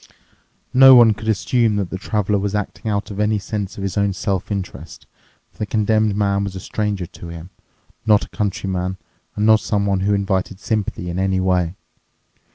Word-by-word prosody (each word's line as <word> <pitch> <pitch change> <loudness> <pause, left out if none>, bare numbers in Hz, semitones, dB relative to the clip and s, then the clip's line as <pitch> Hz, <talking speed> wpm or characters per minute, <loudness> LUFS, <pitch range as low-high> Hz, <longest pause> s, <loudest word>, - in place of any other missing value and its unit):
No 135 0 +9
one 115 -3 +7
could 110 +1 -9
assume 110 +1 +1
that 100 -4 -2
the 95 - -3
Traveler 105 -1 0
was 100 +1 -2
acting 105 +2 -4
out 100 0 -2
of 100 - -6
any 105 0 +2
sense 100 -1 -5
of 100 - -5
his 100 +1 -3
own 100 -1 +1
self 95 +1 -2
interest, 85 -7 -6 0.5
for - - -30
the 105 - -2
Condemned 110 -1 +1
Man 100 -1 +1
was 100 -1 -5
a - - -5
stranger 105 -2 -2
to 85 - -11
him, 85 +2 -9 0.5
not 105 -2 +3
a - - -20
countryman 95 -3 -2 0.4
and 105 - 0
not 110 0 +6
someone 100 -3 0
who 100 +2 +1
invited 95 -1 -1
sympathy 105 -5 -2
in 90 - -3
any 95 0 +1
way. 90 -2 +1
100 Hz, 185 wpm, -20 LUFS, 95-105 Hz, 0.5 s, No